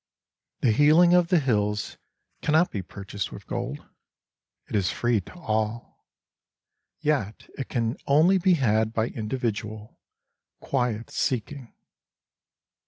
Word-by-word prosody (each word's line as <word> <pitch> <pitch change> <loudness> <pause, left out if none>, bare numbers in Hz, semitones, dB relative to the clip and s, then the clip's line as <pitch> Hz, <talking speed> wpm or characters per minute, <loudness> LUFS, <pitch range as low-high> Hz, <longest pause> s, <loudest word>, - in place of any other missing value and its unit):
The 120 - +4
healing 155 +8 +5
of 180 -1 +5
the 180 - +3
hills 105 -6 -1 0.4
cannot 160 +4 +3
be 100 - -3
purchased 100 +1 -6
with - - -10
gold. - - -4 0.8
It - - -5
is 95 -3 +2
free 120 -3 +1
to - - -14
all—yet 110 - -5
it 135 - -5
can 115 -1 -1
only 160 +7 +5
be 185 0 +4
had 110 -5 +1
by 115 +1 0
individual, 110 -2 -4 0.6
quiet 120 -2 -2
seeking. 130 +1 -3
115 Hz, 110 wpm, -26 LUFS, 105-150 Hz, 0.8 s, healing